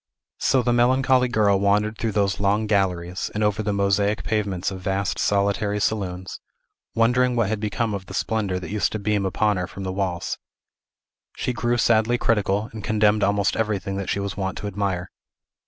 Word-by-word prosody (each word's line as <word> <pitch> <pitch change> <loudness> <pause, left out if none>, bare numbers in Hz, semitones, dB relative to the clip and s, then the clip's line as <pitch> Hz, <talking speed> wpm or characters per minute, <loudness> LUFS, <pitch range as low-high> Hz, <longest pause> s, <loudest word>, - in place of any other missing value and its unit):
So 130 -2 +2
the 120 +1 +2
melancholy 130 +1 +3
girl 105 -5 +2
wandered 105 +2 +2
through 115 -2 -1
those 100 -1 +1
long 100 +2 +1
galleries, 95 -4 0
and 105 - 0
over 105 0 +1
the 105 - -1
mosaic 100 +1 +1
pavements 100 -4 -1
of 95 - -6
vast, 95 +1 -1
solitary 100 +1 +1
saloons, 95 -4 -2 0.6
wondering 125 +2 +3
what 115 -4 +1
had 110 -1 -1
become 105 +1 -1
of 95 -2 -5
the - - -7
splendor 100 -5 -1
that 90 - -7
used 105 -1 0
to - - -1
beam 105 -1 0
upon 105 +1 +1
her 90 -1 -2
from 100 - -8
the 95 0 -3
walls. 95 -3 -2 1.0
She 125 - -1
grew 120 0 0
sadly 115 +1 +3
critical, 105 -2 +1
and 110 -2 -7
condemned 105 -1 +2
almost 100 0 +2
everything 105 -3 -1
that 100 - -4
she - - 0
was 100 0 -3
wont 95 -1 -3
to - - -6
admire. 95 -3 -2
105 Hz, 185 wpm, -23 LUFS, 100-110 Hz, 1.0 s, melancholy